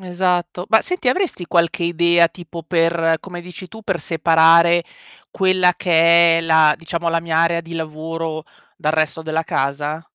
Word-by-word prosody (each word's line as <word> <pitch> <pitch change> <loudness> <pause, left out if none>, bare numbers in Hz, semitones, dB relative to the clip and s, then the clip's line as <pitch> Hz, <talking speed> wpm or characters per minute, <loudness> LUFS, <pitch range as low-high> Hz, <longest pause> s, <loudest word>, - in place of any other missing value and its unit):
Esatto. 180 -1 -2
Ma 220 - +4
senti, 360 -7 -3
avresti 255 - -2
qualche 170 0 0
idea 170 0 +2
tipo 170 -1 -11
per 165 -1 0
come 175 -2 -9
dici 180 +1 -11
tu, 220 +4 -13
per 190 -4 -2
separare 165 +1 +3 0.5
quella 185 -1 +2
che 170 -1 +4
è - - 0
la 160 -2 +3
diciamo 170 0 -4
la 165 0 0
mia 165 -1 -2
area 170 0 +1
di 165 0 -13
lavoro, 160 0 -6 0.3
dal 155 +1 -2
resto 155 0 -1
della 160 0 -2
casa? 145 +2 -3
170 Hz, 160 wpm, -18 LUFS, 160-175 Hz, 0.5 s, Ma